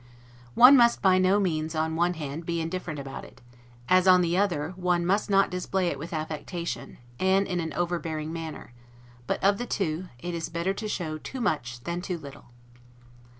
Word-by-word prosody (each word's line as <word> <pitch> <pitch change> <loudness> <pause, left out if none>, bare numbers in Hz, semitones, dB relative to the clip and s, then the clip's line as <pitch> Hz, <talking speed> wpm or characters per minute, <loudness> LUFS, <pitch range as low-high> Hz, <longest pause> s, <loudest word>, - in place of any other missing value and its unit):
One 255 +3 +9
must 235 -4 +4
by 185 -1 +5
no 185 +2 +4
means, 160 -4 -1
on 160 0 -1
one 175 +2 +1
hand, 150 +1 -5
be 170 0 -2
indifferent 165 -1 -4
about 135 -1 -7
it; - - -14 0.5
as, 185 0 +4
on 180 -1 +7
the 170 0 +1
other, 180 -5 0
one 180 -1 0
must 200 +4 +1
not 195 -2 +3
display 180 0 -1
it 140 - -4
with 165 +4 -7
affectation, 160 +2 -5 0.2
and 190 +1 +3
in 180 -2 -2
an 160 -1 -3
overbearing 165 -3 -2
manner, 160 -6 -7 0.5
but, - - -2
of 200 +1 +3
the 245 - -3
two, 180 -2 -2
it 175 +8 -5
is 165 -1 -4
better 170 +3 -1
to 215 +2 -5
show 160 -6 -3
too 260 - -7
much 125 - -2
than 170 +6 -4
too 180 -1 -3
little. 140 -4 -11
175 Hz, 190 wpm, -27 LUFS, 160-190 Hz, 0.5 s, One